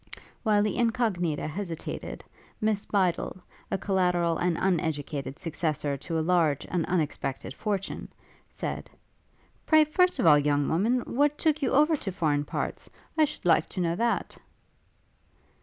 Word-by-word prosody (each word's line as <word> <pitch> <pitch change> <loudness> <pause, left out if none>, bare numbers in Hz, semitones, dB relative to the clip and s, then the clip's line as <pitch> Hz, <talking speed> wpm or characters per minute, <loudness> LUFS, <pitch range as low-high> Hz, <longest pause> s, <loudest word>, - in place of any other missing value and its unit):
While 210 -3 +3
the 210 -2 -1
Incognita 220 -10 0
hesitated, 170 0 -5 0.4
Miss 215 -2 0
Bydel, 185 -3 0 0.3
a - - 0
collateral 180 -4 +1
and 175 -1 +1
uneducated 150 -6 -1
successor 155 -3 -2
to 165 +4 -4
a 160 - 0
large 165 -5 +2
and 175 -3 0
unexpected 150 -6 -2
fortune, 195 +3 -3 0.4
said, - - -5 0.8
'Pray, 310 -1 +6
first 360 +4 +2
of - - 0
all, 150 -3 +7
young 145 -1 +1
woman, 225 +10 +2
what 290 +5 +1
took 310 -2 +1
you 270 - +1
over 300 +4 +5
to 200 - -4
foreign 150 -5 0
parts? - - -4 0.3
I 315 -1 +5
should 300 -8 -9
like 170 -2 +4
to - - -6
know 170 -1 +1
that.' 235 +4 -1
180 Hz, 140 wpm, -28 LUFS, 160-225 Hz, 0.8 s, all